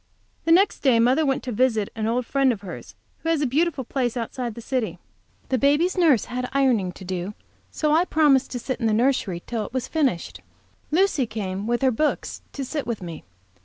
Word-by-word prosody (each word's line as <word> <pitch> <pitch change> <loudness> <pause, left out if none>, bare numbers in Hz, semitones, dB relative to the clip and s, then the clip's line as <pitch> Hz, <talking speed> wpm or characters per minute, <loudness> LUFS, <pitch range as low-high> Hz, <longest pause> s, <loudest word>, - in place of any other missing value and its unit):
The 330 - +2
next 380 +4 +4
day 255 -5 +4
mother 260 +6 +3
went 270 - 0
to 255 - -4
visit 225 -3 +1
an 220 -1 -2
old 240 +2 0
friend 270 +1 +2
of 220 - -4
hers, 190 -3 -9 0.2
who 325 - -3
has 330 -2 +2
a - - +2
beautiful 290 +2 +1
place 245 -1 -2
outside 240 +2 -3
of 235 - -5
the - - -8
city. 245 -1 -2 0.5
The 260 - +1
baby's 290 +6 +3
nurse 315 - +4
had 250 0 -4
ironing 250 -9 +2
to 190 - -11
do, 185 +2 -4 0.3
so 305 -1 0
I 325 +4 +4
promised 290 -6 +3
to 245 - -3
sit 255 +1 -4
in 230 - +1
the 220 - +2
nursery 220 -7 +1
till 230 -3 -2
it 210 - -9
was 260 -1 -2
finished. 275 - -1 0.5
Lucy 315 -6 +2
came, 200 -2 -4
with 240 +2 0
her 260 - +4
books, 300 +6 -1
to 275 - -4
sit 295 +2 -4
with 225 -5 -3
me. 165 -3 -8
255 Hz, 215 wpm, -24 LUFS, 225-285 Hz, 0.5 s, next